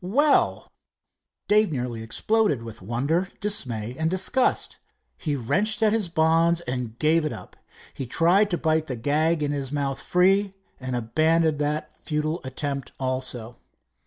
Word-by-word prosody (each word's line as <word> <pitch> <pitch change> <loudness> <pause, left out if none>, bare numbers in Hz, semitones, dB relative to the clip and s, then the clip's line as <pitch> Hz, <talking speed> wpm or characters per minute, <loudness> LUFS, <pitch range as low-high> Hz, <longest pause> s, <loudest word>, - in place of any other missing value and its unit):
"Well!" 280 +11 +2 0.8
Dave 210 -2 +3
nearly 125 -4 -3
exploded 150 - +1
with 115 -4 -10
wonder, 140 - -1
dismay 125 - -2
and 160 0 +1
disgust. 190 +8 +1 0.4
He 150 -3 -3
wrenched 210 - 0
at 215 -1 +4
his 215 -6 +1
bonds, 165 +1 +3
and 125 -6 -5
gave 160 +3 +3
it 155 - -2
up. - - -10 0.4
He 135 - -6
tried 180 - +3
to 175 - 0
bite 160 -1 0
the 130 - -3
gag 150 +6 +1
in 145 - -1
his 140 -2 -3
mouth 140 -2 -2
free, 195 +2 +2 0.2
and 130 -1 -4
abandoned 155 +6 +1
that 150 +1 -2
futile 155 +2 -3
attempt 140 +1 -4
also. 130 -3 -1
155 Hz, 145 wpm, -24 LUFS, 130-180 Hz, 0.8 s, at